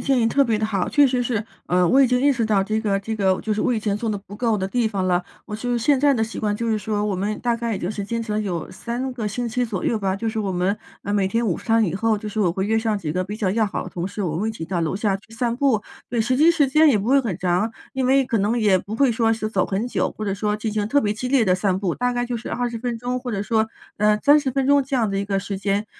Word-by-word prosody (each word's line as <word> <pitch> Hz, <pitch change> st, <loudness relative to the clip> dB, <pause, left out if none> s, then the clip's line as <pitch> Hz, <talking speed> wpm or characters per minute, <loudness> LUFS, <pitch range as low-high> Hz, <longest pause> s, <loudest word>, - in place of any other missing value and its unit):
建 270 Hz, -2 st, +3 dB
议 225 Hz, -, +3 dB
特 280 Hz, +5 st, +3 dB
别 230 Hz, -4 st, +1 dB
地 215 Hz, -, -1 dB
好， 200 Hz, -4 st, -1 dB
确 290 Hz, -1 st, +5 dB
实 250 Hz, -1 st, 0 dB
是。 225 Hz, -3 st, -1 dB, 0.2 s
呃， 180 Hz, 0 st, +3 dB
我 270 Hz, -, +5 dB
已 270 Hz, -, +6 dB
经 250 Hz, +1 st, +2 dB
意 285 Hz, +2 st, +4 dB
识 240 Hz, -3 st, -1 dB
到， 200 Hz, -3 st, +2 dB
这 215 Hz, +2 st, -1 dB
个 200 Hz, -3 st, 0 dB
这 220 Hz, +3 st, -4 dB
个 190 Hz, -3 st, +1 dB
就 215 Hz, -, -1 dB
是 210 Hz, -, -1 dB
我 250 Hz, -, +1 dB
以 -, -, 0 dB
前 205 Hz, -1 st, -1 dB
做 225 Hz, +3 st, -3 dB
得 210 Hz, -, 0 dB
不 200 Hz, +1 st, -11 dB
够 225 Hz, 0 st, +1 dB
的 190 Hz, -1 st, -2 dB
地 235 Hz, +2 st, 0 dB
方 195 Hz, -3 st, -2 dB
了。 180 Hz, 0 st, +2 dB, 0.2 s
我 210 Hz, -, -7 dB
就 245 Hz, +3 st, -3 dB
是 240 Hz, -, +1 dB
现 270 Hz, +3 st, +2 dB
在 285 Hz, 0 st, +4 dB
的 225 Hz, -3 st, +1 dB
习 225 Hz, -, -7 dB
惯， 210 Hz, -1 st, -1 dB
就 230 Hz, +1 st, -2 dB
是 215 Hz, -, +1 dB
说 210 Hz, 0 st, -2 dB
我 205 Hz, -, -1 dB
们 205 Hz, +3 st, -2 dB
大 240 Hz, -1 st, +1 dB
概 230 Hz, -1 st, -2 dB
也 -, -, -3 dB
就 175 Hz, -, -3 dB
是 210 Hz, -1 st, -4 dB
坚 230 Hz, +3 st, -3 dB
持 220 Hz, -, -4 dB
了 210 Hz, -, 0 dB
有 180 Hz, -6 st, -3 dB
3 250 Hz, +2 st, -4 dB
个 225 Hz, -4 st, -3 dB
星 245 Hz, +4 st, -3 dB
期 245 Hz, +2 st, -1 dB
左 215 Hz, -6 st, -3 dB
右 225 Hz, -, +1 dB
吧， 195 Hz, -1 st, -1 dB
就 225 Hz, -, -4 dB
是 220 Hz, 0 st, -2 dB
我 200 Hz, -2 st, -2 dB
们， 185 Hz, +2 st, 0 dB, 0.3 s
呃， 205 Hz, -, -3 dB
每 195 Hz, -2 st, +2 dB
天 230 Hz, +3 st, 0 dB
午 180 Hz, -, 0 dB
餐 225 Hz, -1 st, +2 dB
以 175 Hz, -4 st, -2 dB
后， 220 Hz, +2 st, +1 dB
就 210 Hz, 0 st, -6 dB
是 215 Hz, -, -2 dB
我 185 Hz, -4 st, +3 dB
会 190 Hz, +3 st, -2 dB
约 220 Hz, +2 st, +1 dB
上 220 Hz, -1 st, 0 dB
几 155 Hz, -5 st, -4 dB
个 185 Hz, +1 st, 0 dB
比 205 Hz, +3 st, -6 dB
较 200 Hz, -4 st, 0 dB
要 215 Hz, +2 st, +2 dB
好 -, -, -4 dB
的 185 Hz, -, -8 dB
同 175 Hz, +1 st, -4 dB
事， 200 Hz, +1 st, -5 dB
我 175 Hz, -, -1 dB
们 160 Hz, -, -3 dB
会 220 Hz, -, 0 dB
一 -, -, -2 dB
起 215 Hz, -, -6 dB
到 175 Hz, +1 st, -2 dB
楼 165 Hz, +3 st, -1 dB
下 205 Hz, -1 st, 0 dB
去 220 Hz, +3 st, -17 dB
散 235 Hz, 0 st, -1 dB
步。 250 Hz, -5 st, +2 dB, 0.3 s
对， 240 Hz, -, -2 dB
实 235 Hz, +3 st, +1 dB
际 310 Hz, +6 st, +5 dB
时 315 Hz, -5 st, +3 dB
间 305 Hz, +4 st, +5 dB
也 265 Hz, -, +4 dB
不 205 Hz, +2 st, -2 dB
会 275 Hz, +1 st, +5 dB
很 215 Hz, -10 st, -3 dB
长， 180 Hz, +5 st, 0 dB, 0.2 s
因 260 Hz, -1 st, -1 dB
为 270 Hz, +1 st, +4 dB
可 230 Hz, -3 st, 0 dB
能 210 Hz, +4 st, +1 dB
也 205 Hz, -4 st, +4 dB
不 205 Hz, +4 st, -6 dB
会 265 Hz, -1 st, +3 dB
说 225 Hz, 0 st, +2 dB
是 220 Hz, -1 st, -1 dB
走 190 Hz, -4 st, +1 dB
很 205 Hz, +5 st, -2 dB
久， -, -, -1 dB
或 215 Hz, -, -4 dB
者 200 Hz, -, -1 dB
说 210 Hz, +1 st, -1 dB
进 215 Hz, 0 st, -3 dB
行 210 Hz, -1 st, -1 dB
特 285 Hz, -, +3 dB
别 210 Hz, -5 st, +1 dB
激 250 Hz, +4 st, -4 dB
烈 260 Hz, -3 st, +3 dB
的 185 Hz, -3 st, +3 dB
散 185 Hz, 0 st, 0 dB
步， 190 Hz, -4 st, -1 dB
大 245 Hz, 0 st, 0 dB
概 245 Hz, 0 st, -1 dB
就 240 Hz, -1 st, -3 dB
是 230 Hz, -, -8 dB
20 240 Hz, -1 st, -2 dB
分 240 Hz, 0 st, -3 dB
钟 245 Hz, +2 st, -3 dB
或 245 Hz, -1 st, -5 dB
者 200 Hz, -2 st, -2 dB
说， 220 Hz, +1 st, +1 dB, 0.3 s
呃， 210 Hz, 0 st, +3 dB
30 290 Hz, -1 st, +5 dB
分 270 Hz, +1 st, 0 dB
钟 285 Hz, 0 st, +5 dB
这 270 Hz, 0 st, -2 dB
样 225 Hz, -5 st, +1 dB
的 195 Hz, -, -1 dB
一 200 Hz, -, -2 dB
个 195 Hz, -1 st, 0 dB
时 195 Hz, 0 st, -4 dB
间。 200 Hz, +1 st, 0 dB
220 Hz, 350 characters per minute, -22 LUFS, 200-240 Hz, 0.3 s, 已